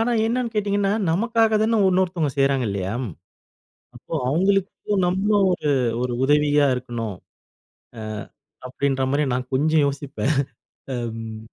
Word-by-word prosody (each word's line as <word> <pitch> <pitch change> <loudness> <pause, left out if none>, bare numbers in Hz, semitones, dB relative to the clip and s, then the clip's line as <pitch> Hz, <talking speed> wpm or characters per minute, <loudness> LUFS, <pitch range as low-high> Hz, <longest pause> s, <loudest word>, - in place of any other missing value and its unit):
ஆனா 240 +2 +1
என்னான்னு 235 0 -1
கேட்டீங்கன்னா, 200 -1 +1 0.2
நமக்காக 225 +3 +2
தான 225 -1 +2
உன்னொருத்தங்க 180 -5 +1
செய்றாங்க 135 -2 +2
இல்லையா? 100 0 -3 1.0
அப்போ - - -10 0.2
அவுங்களுக்கும் 195 +3 +1
நம்ம 190 +3 0 0.5
ஒரு, 130 - +2 0.2
ஒரு 125 -1 -1
உதவியா 145 0 +3
இருக்கணும். 120 -5 -4 0.8
அ - - -6 0.7
அப்படின்ற 135 +1 -1
மாரி 145 +2 +2
நான் 125 0 -3
கொஞ்சம் 155 +3 +3
யோசிப்பேன். 140 -1 -2 0.8
ம் 110 -1 -7
150 Hz, 115 wpm, -23 LUFS, 130-200 Hz, 1.0 s, உதவியா